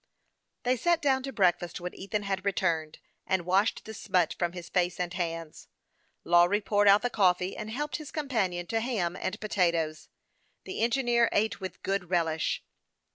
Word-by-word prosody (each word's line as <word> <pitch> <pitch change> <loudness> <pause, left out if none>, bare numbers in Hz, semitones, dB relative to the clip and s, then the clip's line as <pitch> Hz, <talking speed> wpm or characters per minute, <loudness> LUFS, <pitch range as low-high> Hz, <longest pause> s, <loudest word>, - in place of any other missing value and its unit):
They 250 +1 +2
sat 345 +6 +2
down 270 -4 +2
to 270 +1 -5
breakfast 175 -6 +1
when 180 0 -5
Ethan 205 +2 -3
had 195 -1 -2
re 200 - +2
turned, 160 -4 -1 0.3
and 190 -2 0
washed 195 +4 +1
the 220 - -7
smut 180 -5 +1
from 175 -1 0
his 175 -1 -8
face 180 -1 0
and 175 0 -2
hands. 165 -3 -4 0.6
Lawry 175 +4 +4
poured 205 0 +2
out 200 +1 +6
the 245 - 0
coffee, 185 -2 +2
and 215 - -6
helped 295 +6 -3
his 305 -3 -9
com 305 -3 -3
panion 185 -9 -1
to 225 - +1
ham 215 -8 -1
and 195 +2 -4
potatoes. 170 -7 0 0.5
The - - -5
engineer 235 0 +3
ate 205 -1 0
with 185 -2 -7
good 195 -3 -1
relish. 165 -3 0
190 Hz, 180 wpm, -29 LUFS, 175-220 Hz, 0.6 s, out